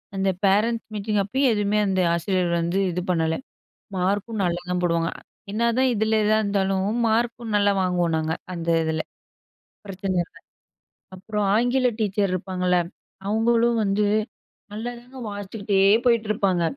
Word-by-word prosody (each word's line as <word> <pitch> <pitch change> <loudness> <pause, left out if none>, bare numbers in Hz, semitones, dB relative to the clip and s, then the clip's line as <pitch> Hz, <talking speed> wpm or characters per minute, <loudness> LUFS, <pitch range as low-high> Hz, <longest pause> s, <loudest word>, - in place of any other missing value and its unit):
அந்த 195 0 +1 0.2
parents 220 +4 +2
meeting 210 0 -1
அப்பயும் 260 +5 +1
எதுவுமே 210 0 +1
அந்த 190 -1 +1
ஆசிரியர் 175 +1 0
வந்து 170 +3 0
இது 180 +1 -2
பண்ணல. 165 -2 +1 0.6
மார்க்கும் 200 +4 -1
நல்லாதான் 180 0 -1
போடுவாங்க, 170 -1 +1 0.4
என்னதான் 235 +4 +2
இதில 220 0 +1
எதா 215 +1 +3
இருந்தாலும் 195 -2 0 0.2
மார்க்கும் 230 0 0
நல்லா 205 0 +3
வாங்குவோம் 175 -3 +1
நாங்க, 160 0 -1 0.2
அந்த 170 -1 -5
இதில. 160 0 -1 0.9
பிரச்சனை 195 -1 -3
இல்ல - - -17 0.8
அப்புறம் 210 +2 -3
ஆங்கில 245 +3 +2
டீச்சர் 200 -2 0
இருப்பாங்கல்ல 180 0 0 0.5
அவங்களும் 230 +2 +2
வந்து 200 +1 +1 0.7
நல்லாதாங்க 240 +4 -7
வாசிச்சுக்கிட்டே 205 0 -2 0.3
போயிட்டுருப்பாங்க. 215 -6 +2
200 Hz, 120 wpm, -24 LUFS, 180-220 Hz, 0.9 s, எதா